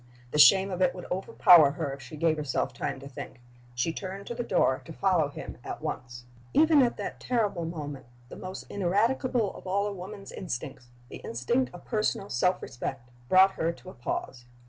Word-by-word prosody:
The 150 - 0
shame 190 +6 +7
of 185 0 -3
it 180 -1 +3
would 180 - -8
overpower 175 -5 +6
her 140 - -3
if 135 - -9
she 130 +4 -10
gave 160 +1 +2
herself 135 -3 -1
time 125 - -3
to 140 - -8
think. 130 -3 -9 0.4
She 125 +7 0
turned 195 +2 -6
to - - -5
the 240 - -3
door 130 - +2
to - - -9
follow 175 -3 +2
him - - -8
at - - -6
once. 120 0 -6 0.3
Even 310 -1 +6
at 245 -2 +1
that - - -5
terrible 210 -9 0
moment 145 -6 -6 0.2
the - - -10
most 185 +1 -7
ineradicable 215 +4 0
of - - -11
all 200 +2 +1
a 205 - -2
woman's 195 +2 -9
instincts 135 -6 -6 0.2
the - - -8
instinct 235 - -1
of 175 - -12
personal 215 -3 -1
self 180 +9 +1
respect 120 0 -6 0.2
brought 190 +1 +7
her 165 -3 -1
to 185 - -12
a - - -14
pause. 120 +1 -5
180 Hz, 195 wpm, -28 LUFS, 140-200 Hz, 0.4 s, shame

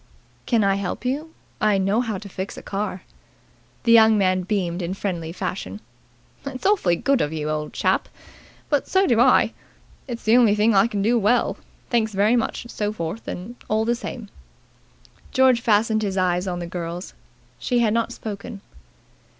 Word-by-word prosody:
"Can 230 -4 +3
I 195 0 +2
help 200 +4 -4
you? 295 +6 -2 0.3
I 210 -2 +3
know 195 +4 +1
how 225 -5 -3
to 200 - -9
fix 190 0 -6
a - - -9
car." 195 -2 -4 0.8
The 230 - +3
young 220 -1 +7
man 185 -2 +2
beamed 185 -2 -2
in 175 +2 -3
friendly 175 -5 -3
fashion. 105 - -5 0.6
"It's 275 +1 -7
awfully 380 - +3
good 275 +8 +1
of 145 - -1
you, 155 -1 -3
old 150 0 -3
chap, - - 0 0.6
but 290 -3 0
so 380 +1 +3
do 235 -7 +2
I. 255 +2 +4 0.5
It's 240 -2 -6
the 225 +2 +5
only 225 -4 +5
thing 215 +2 +3
I 195 +2 +5
can 205 -4 -2
do 235 +3 +3
well. 230 +4 +2 0.4
Thanks 220 -3 +1
very 205 +4 +3
much 235 - -1
and 235 - -11
so 210 -1 -2
forth 195 +1 -5 0.4
all 220 +1 +1
the 235 - +2
same." 235 -2 -7 1.0
George 260 -2 +4
fastened 215 0 +2
his 195 -2 -2
eyes 180 0 +1
on 180 -1 -2
the 175 - -4
girl's. 170 +1 -6 0.5
She 245 - 0
had 230 -3 +3
not 230 0 0
spoken. 205 -1 -7
210 Hz, 175 wpm, -23 LUFS, 185-235 Hz, 1.0 s, young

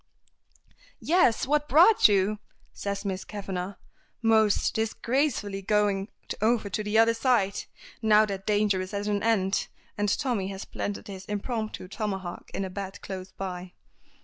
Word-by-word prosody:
"Yes! 320 -10 +3
what 295 +2 +1
brought 350 +9 +7
you?" 205 +1 +2 0.3
says 200 0 -4
Miss 190 -1 -2
Kavanagh, 195 -2 -5 0.5
most 220 -2 +3
disgracefully 225 -2 -1
going 205 -1 +1 0.3
over 220 -2 +2
to 215 - -1
the 210 +1 0
other 225 +1 +6
side, 230 -5 +1 0.4
now 215 -1 +5
that 195 -2 -6
danger 205 -2 +2
is 185 +2 -6
at 200 0 -2
an 205 -1 0
end, 205 -3 +1 0.3
and 205 0 +1
Tommy 235 -6 0
has 195 0 -6
planted 205 - -5
his 190 -1 -8
impromptu 215 -1 -4
tomahawk 190 -3 -4
in 195 - -3
a - - -5
bed 195 0 -6
close 190 -1 -6
by. 180 -1 -6
205 Hz, 145 wpm, -27 LUFS, 195-220 Hz, 0.5 s, brought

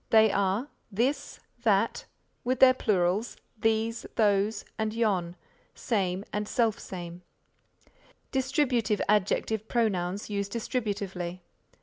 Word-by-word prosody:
They 220 -1 +6
are 200 +6 +1 0.2
this, 245 +8 -1 0.2
that 220 -1 +2 0.4
with 255 +1 0
their 260 -1 +8
plurals 205 -2 0 0.2
these, 225 +1 0
those, 205 0 +2
and 220 0 -1
yon, 190 -7 0 0.4
same 195 -3 -1
and 210 0 -1
selfsame. 185 -7 -2 1.1
Distributive 260 -5 +1
Adjective 210 +1 +1
Pronouns 200 -5 0
used 200 -1 -3
distributively. 200 -7 -3
210 Hz, 95 wpm, -28 LUFS, 195-230 Hz, 1.1 s, their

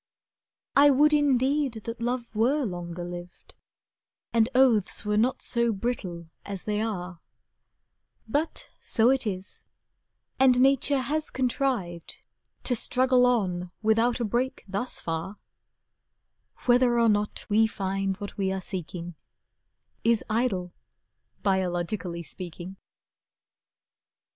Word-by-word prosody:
I 285 +1 +7
would 295 +2 +5
indeed 275 -3 +2
that 230 0 -6
love 240 0 -2
were 255 +6 +2
longer 175 -3 -5
lived, 175 0 -9 0.8
And 230 0 +3
oaths 240 -7 +3
were 210 0 +1
not 240 +5 +1
so 235 -1 +2
brittle 190 -6 -3 0.2
as 195 -2 -6
they 210 0 -1
are, 185 -6 -4 1.1
But 290 +8 -2
so 235 +2 +3
it 265 -4 0
is, 190 -1 -5 0.8
and 255 -2 +5
nature 270 +1 +3
has 305 +4 -1
contrived 245 - -2 0.4
To 250 - +1
struggle 250 +1 +3
on 185 -7 0
without 225 +3 +3
a 235 - 0
break 245 +5 -1
thus 200 +6 -2
far, 165 +5 -4 1.3
Whether 245 -1 +4
or 230 - +4
not 210 -1 0
we 220 +2 +4
find 195 -2 -2
what 205 0 -8
we 190 -1 +1
are 190 - -2
seeking 175 -2 -6 0.9
Is 230 -2 +3
idle, 205 -6 0 0.7
biologically 180 -2 -1
speaking. 175 +2 -8
220 Hz, 115 wpm, -27 LUFS, 185-250 Hz, 1.3 s, I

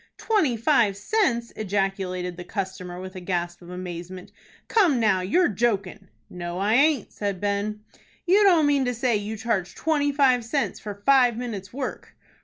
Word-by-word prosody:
"Twenty 355 - +1
five 230 -5 +2
cents!" 235 - 0
ejaculated 195 -3 -2
the 180 - -8
customer, 185 -2 -5
with 185 +1 -8
a - - -5
gasp 175 -1 -3
of 175 - -13
amazement. 180 0 -7 0.4
"Come 355 - +3
now, 210 -5 +2
you're 340 - +2
jokin'." 200 -3 -1 0.2
"No, 175 -1 -6
I 200 +3 +1
aint," 280 +1 +3
said 200 -3 -3
Ben. 205 +1 -2 0.4
"You 380 +4 +4
don't 355 -6 +5
mean 285 -2 +3
to 245 0 -1
say 240 0 +1
you 210 +2 -5
charge 210 -5 -2
twenty 295 -3 +1
five 265 -4 +3
cents 275 +4 -2
for 205 -1 -8
five 255 -4 +5
minutes' 220 -6 -5
work?" 265 +1 -6
210 Hz, 165 wpm, -25 LUFS, 185-265 Hz, 0.4 s, don't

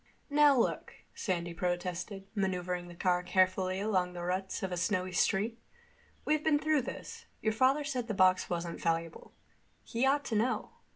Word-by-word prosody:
"Now, 290 -1 +6
look," 235 - 0 0.2
Sandy 175 -3 -2
protested, 180 +2 -3
maneuvering 180 -3 -2
the 175 - -11
car 180 0 +1
carefully 185 +1 +1
along 185 -4 0
the 175 -1 -6
ruts 185 +2 -2
of 190 - -2
a - - -1
snowy 185 +1 0
street. 210 +5 +1 0.7
"We've 305 0 +1
been 310 -2 +4
through 310 -1 +2
this. 460 - -8
Your 220 0 0
father 260 +6 +3
said 255 -5 -3
the 220 - -2
box 185 -1 +4
wasn't 170 -1 -3
valuable. 165 0 -2 0.5
He 240 +3 0
ought 285 +1 +2
to 225 - -2
know. 230 +4 0
190 Hz, 165 wpm, -32 LUFS, 180-245 Hz, 0.7 s, Now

